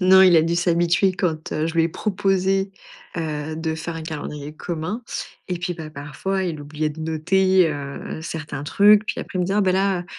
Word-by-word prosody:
Non, 190 +1 +7
il 185 -2 +7
a 160 - +6
dû 165 +1 0
s'habituer 175 +2 +3
quand, 165 -4 -2
heu, 155 +1 0
je 165 - -4
lui 165 - +4
ai - - +1
proposé, 195 0 0 0.4
heu, 155 -2 -3
de 160 0 -2
faire 165 +1 -5
un 165 - -5
calendrier 150 -2 -6
commun 175 +9 -4 0.5
et 180 -1 -2
puis, 175 0 -2
bah, 160 -2 -8
parfois, 150 +7 -3
il 165 -4 -3
oubliait 150 +1 -2
de 150 +1 -8
noter, 180 +3 +3
heu, 145 +1 -6
certains 155 -4 -5
trucs. 205 +6 +5
Puis 235 - -2
après, 185 - -5
il - - +2
me - - +2
dit: 190 - -1
«Oh - - +4
ben 190 -2 +3
là, 190 -1 +1
170 Hz, 210 wpm, -22 LUFS, 155-190 Hz, 0.5 s, Non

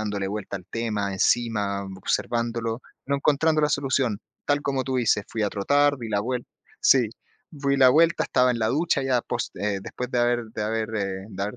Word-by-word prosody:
dándole 100 -2 -2
vuelta 100 -1 -4
al 90 - -17
tema, 105 -3 -2
encima 100 -1 +1
observándolo, 115 +4 -1 0.2
no 140 +1 +1
encontrando 155 +2 +2
la 150 - +3
solución. 130 -6 0 0.2
Tal 145 0 +1
como 135 -2 -1
tú 130 0 -1
dices, 115 -4 +2
fui 110 - -3
a 105 - +2
trotar, 145 +9 +2
di 115 - -6
la 100 -1 +1
vuel 125 +2 -3 0.3
sí, 125 -5 +5 0.4
di 140 -3 0
la 130 -1 +8
vuelta, 165 +5 +4
estaba 125 0 +3
en 120 - -1
la 110 -1 +1
ducha 160 +6 +1
ya 130 -3 +1
pos - - -3
eh, 100 -1 -1
después 125 +4 -6
de 125 - 0
haber 120 0 +2
de 110 - -2
haber, 110 +1 -2
eh, 95 -1 -3
de 95 -1 -5
haber 105 +4 -3
115 Hz, 200 wpm, -25 LUFS, 105-135 Hz, 0.4 s, la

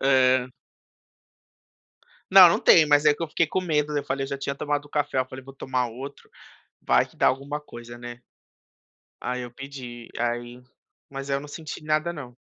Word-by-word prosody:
Hã. 130 -1 +3 1.8
Não, 190 -2 +11
não 170 - +1
tem, 160 -2 +6
mas 145 0 +4
é 150 - +6
que 145 - -9
eu - - -1
fiquei 160 +1 +1
com 185 - 0
medo, 150 -4 0
né, 145 - 0
eu - - -12
falei 135 +1 -2
eu - - -7
já 140 - -4
tinha 140 0 -3
tomado 145 +1 -2
o 145 - -15
café, 145 -2 -1
eu 130 - +1
falei: 130 0 -10
"Vou 135 - -11
tomar 130 -2 -2
outro, 135 +5 -10 0.5
vai - - +3
que - - -23
dá - - +4
alguma 140 +3 -3
coisa, 120 -4 -11
né". 120 0 -9 1.0
Aí 125 0 -3
eu 120 - -7
pedi, 125 -3 -9
aí, 120 +1 -3 0.5
mas 135 0 -6
aí 140 - +2
eu - - -4
não 145 - -10
senti 155 +1 -8
nada 155 +2 +1
não. 135 -7 -9
135 Hz, 200 wpm, -25 LUFS, 125-150 Hz, 1.8 s, Não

